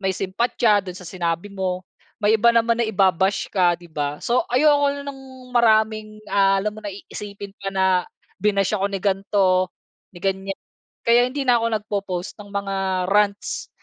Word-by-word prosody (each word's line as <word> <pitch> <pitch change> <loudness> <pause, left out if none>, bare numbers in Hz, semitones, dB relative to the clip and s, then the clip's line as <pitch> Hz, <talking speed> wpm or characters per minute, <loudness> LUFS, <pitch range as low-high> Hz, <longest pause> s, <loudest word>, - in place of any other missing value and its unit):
may 190 -1 -1
simpatya 210 +2 +2
dun 185 -2 -8
sa 180 - -10
sinabi 170 +2 -3
mo. 185 -2 -3 0.4
May 215 +1 +4
iba 235 - +5
naman 230 +1 +3
na - - +3
iba-bash 195 -1 +2
ka, 180 -3 +3
di - - -14
ba? 145 -2 -3
So, 240 +1 +2
ayoko 285 +2 +4
na 285 - -6
ng 275 -1 -7 0.3
maraming, 215 -2 +2
ah, 195 0 +4
alam 210 +1 -2
mo 215 - -8
na - - -3
iisipin 200 0 -9
pa, 195 - -3
na 190 -2 +2 0.4
binash 200 -1 +1
ako 195 - -1
ni - - 0
gan'to, 190 -2 +2 0.5
ni - - -10
gan'yan, 195 +1 -2 0.4
kaya 235 +1 +5
hindi 275 +1 -3
na 245 - +6
ako 230 - 0
nagpo-post 200 -4 -4
ng 205 - -10
mga, 200 -1 -2 0.3
rants 205 0 0
200 Hz, 175 wpm, -22 LUFS, 190-215 Hz, 0.5 s, na